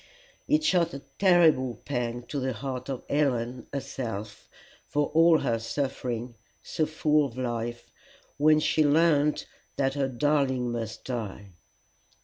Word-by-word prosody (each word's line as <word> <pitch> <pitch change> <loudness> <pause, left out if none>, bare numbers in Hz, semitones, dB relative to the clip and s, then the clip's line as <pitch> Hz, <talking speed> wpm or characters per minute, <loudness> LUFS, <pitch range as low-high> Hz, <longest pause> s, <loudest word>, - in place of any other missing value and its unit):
It 305 +1 +3
shot 175 - +2
a 140 - -8 0.2
terrible 160 -10 +4
pang 120 -3 -2
to 140 - -4
the 130 0 -1
heart 130 +3 -5
of 130 -2 -4
Helen, 125 -4 0
herself, 115 -6 -6 0.4
for 145 -1 0
all 165 0 +6
her 115 -1 0
suffering, 125 -1 -3 0.3
so 155 - -1
full 155 -1 +2
of 130 -4 -5
life, 120 -1 -4 0.5
when 155 +1 +5
she 155 0 +2
learned 150 0 +3 0.3
that 135 -1 0
her 140 -1 0
darling 130 -2 +1
must 115 -2 -5
die. 105 -5 -5
135 Hz, 130 wpm, -27 LUFS, 120-150 Hz, 0.5 s, all